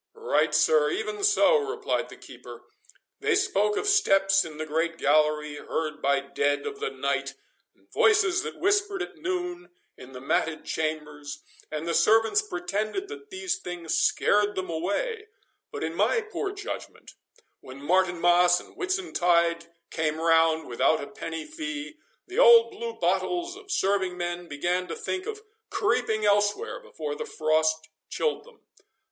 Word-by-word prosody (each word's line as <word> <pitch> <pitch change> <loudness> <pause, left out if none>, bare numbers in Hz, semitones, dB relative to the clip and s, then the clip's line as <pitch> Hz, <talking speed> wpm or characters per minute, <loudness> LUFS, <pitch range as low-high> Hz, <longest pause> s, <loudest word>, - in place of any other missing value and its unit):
"Right, 465 +2 +1
sir, 470 0 +4
even 420 +1 -3
so," 420 +4 +5
replied 440 +1 -2
the - - -12
keeper. - - -12 0.6
"They 430 0 +1
spoke 290 - +1
of - - -1
steps 195 - +4
in 155 -2 -9
the 155 - -4
great 165 +2 -1
gallery, 150 0 +2
heard 155 0 -4
by 140 0 +2
dead 145 +1 -1
of 420 -1 -5
the 450 +1 -2
night, - - -2 0.4
and - - -32
voices 395 -4 +3
that - - -6
whispered 400 0 +1
at - - -10
noon, 355 -1 -4 0.3
in 125 +1 -13
the 125 - -8
matted 155 +4 -1
chambers; 150 -2 -4 0.3
and 155 +2 -4
the 170 - 0
servants 225 - +4
pretended 215 - -3
that 430 -1 -10
these 375 -1 -3
things 175 -2 -4
scared 205 0 +2
them 185 -2 -3
away; 315 - -2 0.4
but, - - -5
in - - -2
my 480 - +2
poor 430 -2 -4
judgment, 410 +3 -8 0.5
when 130 +1 -11
Martinmas 175 +2 +3
and - - -15
Whitsuntide 175 - +1 0.2
came 155 0 -1
round 165 -1 +3
without 120 +3 +1
a - - -4
penny 160 +2 -6
fee, 310 -1 -6 0.3
the 380 +6 -4
old 475 -2 +7
blue 460 +3 -5
bottles 350 -4 -1
of 400 0 -14
serving 190 - 0
men 175 0 -4
began 175 +5 -1
to - - -5
think 405 -3 -4
of 430 -1 -6 0.3
creeping 220 - 0
elsewhere 205 0 +1
before 150 -2 -6
the 145 - -5
frost 155 0 +1 0.2
chilled 465 - -2
them. 485 -2 -19
205 Hz, 155 wpm, -26 LUFS, -, 0.6 s, old